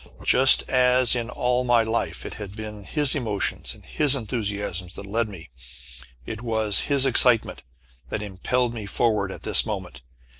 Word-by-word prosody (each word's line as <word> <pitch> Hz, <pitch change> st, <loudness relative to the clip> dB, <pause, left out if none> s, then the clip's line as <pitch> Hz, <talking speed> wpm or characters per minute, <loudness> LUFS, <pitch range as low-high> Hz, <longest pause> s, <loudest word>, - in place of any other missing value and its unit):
Just 130 Hz, +1 st, +5 dB
as 125 Hz, -1 st, +3 dB
in 120 Hz, -1 st, -3 dB
all 125 Hz, 0 st, -1 dB
my 120 Hz, -2 st, +3 dB
life 110 Hz, +1 st, -3 dB
it -, -, -6 dB
had 100 Hz, -2 st, -9 dB
been 105 Hz, -2 st, -8 dB
his 145 Hz, +5 st, 0 dB
emotions 110 Hz, -8 st, -2 dB
and -, -, -19 dB
his 145 Hz, -3 st, +3 dB
enthusiasms 100 Hz, -6 st, -4 dB
that 100 Hz, -, -9 dB
led 110 Hz, +2 st, -2 dB
me, 85 Hz, -8 st, -12 dB, 0.7 s
it 110 Hz, -, -7 dB
was 110 Hz, -4 st, 0 dB
his 140 Hz, -2 st, +3 dB
excitement 125 Hz, -, +3 dB, 0.5 s
that 105 Hz, -, -4 dB
impelled 115 Hz, +5 st, -2 dB
me 110 Hz, -3 st, -7 dB
forward 105 Hz, -2 st, 0 dB
at -, -, -10 dB
this -, -, +4 dB
moment. -, -, -6 dB
115 Hz, 160 wpm, -23 LUFS, 105-125 Hz, 0.7 s, Just